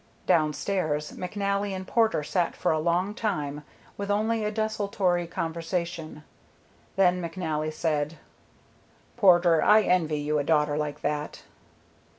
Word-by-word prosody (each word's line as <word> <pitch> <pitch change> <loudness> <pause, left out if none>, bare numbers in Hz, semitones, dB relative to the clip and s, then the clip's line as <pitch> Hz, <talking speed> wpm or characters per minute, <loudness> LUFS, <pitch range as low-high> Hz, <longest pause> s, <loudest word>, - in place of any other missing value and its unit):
Downstairs, 155 -1 0
McNally 200 +1 -2
and 190 0 -6
Porter 225 -9 +2
sat 170 +3 -1
for - - 0
a 155 - +1
long 175 +5 0
time 150 -10 -3 0.3
with 200 0 -4
only 215 +2 +1
a 210 - 0
desultory 205 -5 -1
conversation. 165 -1 -4 0.7
Then 180 -2 +3
McNally 160 -3 -3
said, 155 0 -1 1.0
"Porter, 175 -6 +5
I 215 0 +6
envy 165 -5 +1
you 150 +1 0
a - - 0
daughter 150 -1 +2
like 150 -1 -3
that." 150 0 -3
175 Hz, 125 wpm, -27 LUFS, 155-200 Hz, 1.0 s, I